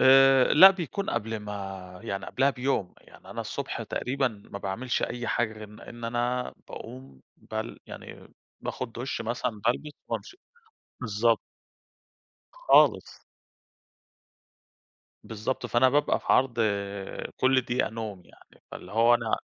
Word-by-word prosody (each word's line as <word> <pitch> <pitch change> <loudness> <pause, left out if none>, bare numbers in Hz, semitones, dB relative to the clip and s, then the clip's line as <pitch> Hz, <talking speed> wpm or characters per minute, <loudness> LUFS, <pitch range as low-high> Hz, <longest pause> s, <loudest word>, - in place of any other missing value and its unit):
آآ، 135 0 +7
لأ 185 +6 +11
بيكون 190 +1 -3
قبل 110 +1 -2
ما 95 -3 -7
يعني 100 -4 -4
قبلها 135 +2 +2
بيوم، 125 -8 -1
يعني - - -16
أنا - - -4
الصُبح - - -4
تقريبًا 135 +1 -1 0.2
ما 100 - -5
باعملش 105 +6 -2
أي 120 0 -3
حاجة 115 -2 0
غير 110 0 -9
إن 105 +1 -13
إن 120 0 -10
أنا 120 +2 -1
باقوم 65 +1 -10 0.2
بل 110 +1 -6
يعني - - -10 0.3
باخُذ 130 - -4
دُش 125 +4 -4
مثلًا، 115 +2 -1 0.2
بالبس 150 +5 0 0.2
وأمشي 385 -2 -5 0.7
بالضبط. 115 0 +2 1.1
خالص. - - +3 2.0
بالضبط، 110 +3 -3
فأنا 120 +2 +4
بابقى 145 +3 +2
في - - -18
عرض 125 -2 +3 0.8
كُل 130 0 +4
دقيقة 125 0 -1
نوم 110 -4 -6
يعني. - - -22
فاللي 90 - -9
هو 115 +2 +5
أنا - - 0
120 Hz, 130 wpm, -27 LUFS, 105-130 Hz, 2.0 s, لأ